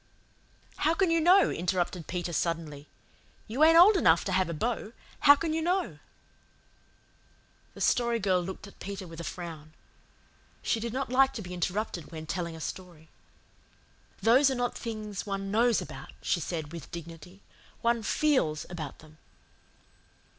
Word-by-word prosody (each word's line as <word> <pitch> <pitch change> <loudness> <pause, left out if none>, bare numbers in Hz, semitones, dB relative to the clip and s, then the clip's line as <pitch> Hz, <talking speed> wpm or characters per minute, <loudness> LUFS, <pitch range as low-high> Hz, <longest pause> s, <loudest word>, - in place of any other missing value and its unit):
"How 320 +2 +2
can 380 -2 +2
you 330 0 +3
know?" 370 +4 +5
interrupted 175 -1 -2
Peter 175 -1 -3
suddenly. 155 -3 -2 0.6
"You 250 +8 +1
ain't 325 +1 +7
old 390 +5 +8
enough 170 - +4
to 195 - -2
have 185 -1 +1
a - - -2
beau. 225 +4 -2 0.3
How 285 - +8
can 320 +1 -2
you 325 - 0
know?" 360 +3 -1 1.8
The - - -9
Story 235 -1 +2
Girl 190 -4 +1
looked 190 +3 -7
at 200 - -15
Peter 195 -1 -6
with 165 -1 -10
a - - -5
frown. 160 -3 -7 0.9
She 230 - 0
did 235 +1 -4
not 260 +1 -3
like 270 +1 +4
to 220 - -6
be 180 0 -8
interrupted 180 -1 -3
when 160 -1 -7
telling 170 0 -3
a - - -9
story. 170 -3 -8 1.1
"Those 260 +5 +6
are 265 - -1
not 245 0 -1
things 215 -3 -5
one 195 0 -3
KNOWS 230 +1 +3
about," - - -10
she 175 - +1
said 160 -2 -4
with 170 -4 -8
dignity. 170 +3 -10 0.4
"One 235 0 +2
FEELS 220 - +1
about 155 -5 -6
them." 155 0 -19
195 Hz, 160 wpm, -29 LUFS, 170-245 Hz, 1.8 s, old